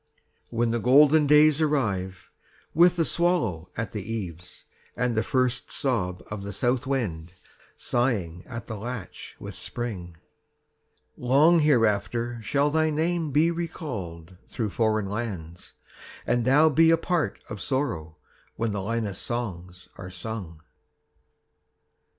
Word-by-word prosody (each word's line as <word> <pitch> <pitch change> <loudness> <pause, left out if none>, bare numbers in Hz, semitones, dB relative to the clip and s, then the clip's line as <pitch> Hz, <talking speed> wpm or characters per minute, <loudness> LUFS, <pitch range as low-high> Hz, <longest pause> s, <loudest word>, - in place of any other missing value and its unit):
When 115 0 0
the 120 - 0
golden 145 +5 +5
days 150 +1 +6
arrive, 100 - -1 0.4
With 175 +2 +5
the 165 -2 +1
swallow 120 - +1
at 115 -2 -3
the 105 - -4
eaves, 90 -5 -6 0.3
And 125 -2 0
the 110 - +2
first 125 +1 0
sob 90 -10 -1
of 105 -2 -4
the 100 +1 -6
south 125 +5 0
wind 90 -12 -2 0.5
Sighing 100 -9 -1
at 120 -2 -7
the 110 - -6
latch 110 -3 -7
with - - -8
spring, 95 -9 -6 1.0
40 125 - -7
Long 155 +7 +6
hereafter 120 -3 +1
shall 140 +6 +1
thy 160 +1 +2
name 160 +1 0
Be 155 +4 +3
recalled 100 - -6
through 110 -4 -3
foreign 110 -2 +1
lands, 95 -6 -6 0.5
And 120 -1 +1
thou 150 +5 +5
be 160 +2 +5
a 165 - +5
part 170 -1 -1
of 110 -2 -7
sorrow 85 - -2 0.4
When 115 0 -1
the 100 -1 -2
Linus 105 -2 -2
songs 90 -7 -5
are 90 - -7
sung. 90 -4 -7
115 Hz, 135 wpm, -26 LUFS, 95-145 Hz, 1.0 s, days